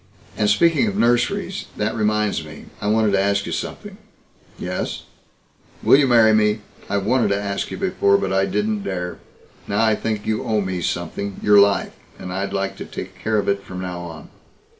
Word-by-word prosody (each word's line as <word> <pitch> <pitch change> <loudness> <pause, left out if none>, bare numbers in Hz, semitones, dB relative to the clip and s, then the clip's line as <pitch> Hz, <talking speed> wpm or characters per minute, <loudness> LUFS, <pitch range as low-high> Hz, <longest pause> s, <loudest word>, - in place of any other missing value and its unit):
"And 105 - +1
speaking 170 - +3
of 200 -1 -2
nurseries 120 0 +1
that - - 0
reminds 105 -5 0
me. 75 0 -11 0.2
I 105 - -2
wanted 110 0 +3
to 100 -1 +3
ask 100 0 +1
you - - -5
something." - - -5 0.6
"Yes?" 90 +1 -4 0.8
"Will - - +7
you 140 -1 +4
marry 115 -3 +6
me? 105 0 +2 0.3
I've 100 -1 -1
wanted 125 +2 +3
to 100 - +1
ask 100 -1 -3
you - - -6
before, 180 - +2
but 95 -1 -2
I 95 0 +2
didn't 105 +1 -1
dare. 90 -3 -4 0.5
Now 100 +3 +2
I 110 - +4
think 105 -1 -2
you 110 -1 -1
owe 110 -2 +1
me 95 -2 -3
something 85 +4 -3
your 105 -1 +6
life. 100 0 +3 0.2
And 90 - -7
I'd 95 +1 -2
like 100 0 -2
to - - -6
take - - -7
care 110 0 0
of 105 - 0
it 100 0 +1
from 95 - -8
now 90 -1 -5
on." 85 -3 -9
100 Hz, 195 wpm, -21 LUFS, 95-110 Hz, 0.8 s, Will